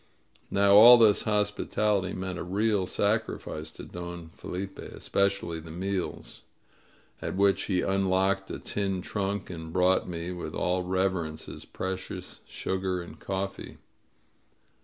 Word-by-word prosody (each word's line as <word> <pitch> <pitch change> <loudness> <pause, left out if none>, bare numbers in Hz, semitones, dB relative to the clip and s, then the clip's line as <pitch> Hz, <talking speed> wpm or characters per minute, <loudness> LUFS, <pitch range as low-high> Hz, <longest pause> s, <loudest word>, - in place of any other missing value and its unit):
Now 100 0 +4
all 120 +4 +11
this 110 -3 +5
hospitality 105 -2 +1
meant 95 -1 -4
a - - -3
real 100 +1 +1
sacrifice 100 -7 -1
to - - -10
Don 85 -1 -7
Felipe, 95 +3 -6
especially 100 -4 -1
the 80 0 -11
meals, 95 +3 -4 0.8
at - - -3
which 100 0 +3
he 90 -3 +1
unlocked 95 0 +1
a - - -4
tin 95 -3 -2
trunk 100 -2 -3
and 80 -2 -7
brought 90 +1 +2
me 85 0 -4
with 85 -3 -6
all 90 +1 +1
reverence 90 -4 -1
his - - -9
pre 95 0 -3
cious 95 0 -8
sugar 95 -1 -2
and 85 - -12
coffee. 95 0 -4
95 Hz, 135 wpm, -28 LUFS, 90-100 Hz, 0.8 s, all